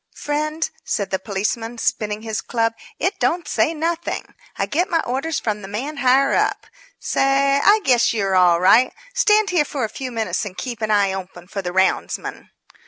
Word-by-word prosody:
"Friend," 305 +2 -2 0.2
said 200 - -2
the 190 - 0
policeman, 220 +4 -3
spinning 215 -1 -1
his 220 -2 -3
club, 230 -1 0 0.2
"it 370 +5 -1
don't 345 -1 0
say - - +1
nothing. 330 +1 -3 0.2
I - - 0
get 360 +4 0
my 330 -3 +2
orders 275 +5 -2
from 210 -2 -2
the 195 - -8
man 260 +10 -5
higher 270 +1 +3
up. - - 0 0.3
Say, 275 +1 +2
I 420 +1 +5
guess 245 -3 +3
you're 195 -4 0
all 175 -2 +5
right. 225 +8 +5 0.2
Stand 430 -4 +3
here 345 -4 +3
for 285 -3 -4
a 220 - -1
few 255 +3 -6
minutes 225 -2 -2
and 195 -3 -7
keep 240 -3 -5
an 215 - -1
eye 200 -2 +3
open 180 -2 -8
for 195 +1 -4
the 175 -2 -4
roundsman." 190 +1 -1
240 Hz, 185 wpm, -21 LUFS, 205-300 Hz, 0.3 s, I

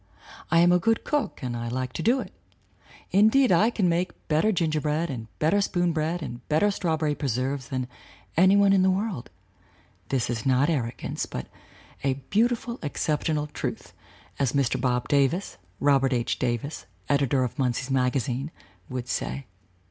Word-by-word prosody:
I 165 +1 +5
am 175 +1 +5
a 180 - +5
good 225 +5 +1
cook 295 - -2
and 125 -1 -3 0.2
like 130 0 -3
to - - -4
do 245 +4 +3
it; - - -9 0.8
indeed 220 +6 +5
I 200 +6 +5
can 210 -6 +1
make 175 +2 -2
better 160 +7 +3
gingerbread 155 -2 0
and 115 -4 -6
better 165 +7 +2
spoon 175 -3 +1
bread 160 +2 -1
and 120 -3 -6
better 160 +7 +3
strawberry 160 -6 0
preserves 135 -1 -2
than 130 -1 -2 0.5
any 185 +4 +6
one 200 -1 +5
in 195 - +4
the 190 - +4
world 190 - -2 0.8
this 130 -3 0
is 115 -2 -3
not 135 +4 +3
arrogance, 120 -7 -3
but 65 - -5 0.6
a 135 -1 +1 0.2
beautiful 235 +2 +1
excep 150 0 -1
tional 150 -2 -1
truth, - - -5 0.5
as 135 -4 +1
Mr. 130 -3 +1
Bob 125 -1 0
Davis 145 +7 +1 0.2
[Robert 135 -2 +3
H. 120 -1 -1
Davis, 125 +1 -2 0.2
editor 140 -2 +2
of 125 +4 -4
Munsey's 130 +1 -1
Magazine] 130 +1 0 0.4
would 125 -1 -4
say. 65 - -3
150 Hz, 160 wpm, -26 LUFS, 130-180 Hz, 0.8 s, any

